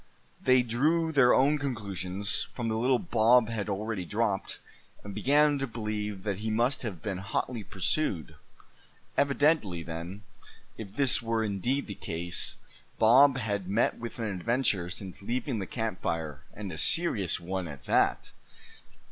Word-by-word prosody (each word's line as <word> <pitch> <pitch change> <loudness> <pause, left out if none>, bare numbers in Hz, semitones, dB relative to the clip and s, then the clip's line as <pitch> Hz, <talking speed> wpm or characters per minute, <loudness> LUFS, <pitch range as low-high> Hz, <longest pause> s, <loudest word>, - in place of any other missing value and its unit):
They 130 -1 +4
drew 155 +8 +1
their 135 -5 +5
own 145 +3 +4
conclusions 100 -7 -3
from 120 -2 -2
the 110 - 0
little 125 +3 +3
Bob 120 -4 +4
had 110 -3 -3
already 105 0 -2
dropped; 105 +1 -1 0.4
and 100 - -7
began 145 +4 +3
to 135 - -1
believe 105 -3 -4
that 100 -2 -2
he 110 +1 -3
must 120 +5 +1
have 100 -10 -6
been 100 -4 -3
hotly 110 +4 -3
pursued. 95 - -2 0.8
Evidently 140 - +2
then, 85 +5 -7 0.5
if 100 -3 -9
this 135 -2 +4
were 115 -1 0
indeed 110 +7 -1
the 100 - -6
case, 85 -1 -4 0.4
Bob 130 +5 +6
had 100 -6 -2
met 105 +5 +1
with 120 0 -6
an 115 - -3
adventure 100 -2 0
since 95 -1 -7
leaving 120 +3 -2
the 95 - -4
camp 110 -5 -3
fire, 80 -4 -3
and 100 -3 -7
a 80 - -4
serious 115 - +2
one 90 +1 -4
at 70 -3 -9
that. - - +2
110 Hz, 150 wpm, -29 LUFS, 95-125 Hz, 0.8 s, Bob